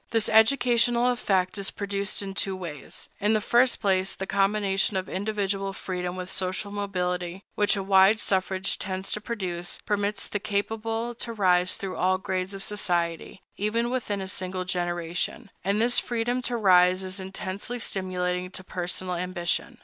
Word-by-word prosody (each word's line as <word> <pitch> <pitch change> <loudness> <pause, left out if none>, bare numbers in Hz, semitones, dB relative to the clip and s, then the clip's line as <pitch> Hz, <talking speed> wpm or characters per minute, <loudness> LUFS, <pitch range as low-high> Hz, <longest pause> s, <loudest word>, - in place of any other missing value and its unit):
This 225 -2 +1
educational 240 +1 +4
effect 195 -5 0
is 195 - -1
produced 200 0 -2
in 195 -1 -5
two 195 0 0
ways: 165 -6 -7
In 210 +1 +3
the 215 - +3
first 240 +4 +3
place, 190 -2 +2
the 190 - -4
combination 195 0 +1
of 185 - -2
individual 195 -1 -2
freedom 180 -2 -4
with 185 0 -6
social 190 +2 -2
mobility, 180 -2 -2
which 205 0 +3
a 195 - -2
wide 195 +2 +5
suffrage 190 -1 0
tends 190 0 -3
to 210 - -2
produce, 185 -6 -3
permits 205 -1 0
the 205 - -2
capable 225 +3 -2
to 235 0 -4
rise 180 -4 +3
through 195 -2 -5
all 185 +1 +3
grades 185 +1 -3
of 195 - -5
society, 175 -3 -1
even 230 +4 0
within 210 -6 -2
a 190 - -4
single 185 -1 -3
generation; 175 +4 -2
and 200 +3 +1
this 240 +2 +4
freedom 240 +1 -1
to 245 -1 -1
rise 185 -2 +5
is 185 +1 -4
intensely 190 +4 -4
stimulating 180 -4 -1
to 185 - -8
personal 180 0 -2
ambition. 175 0 -2
195 Hz, 160 wpm, -27 LUFS, 185-210 Hz, -, wide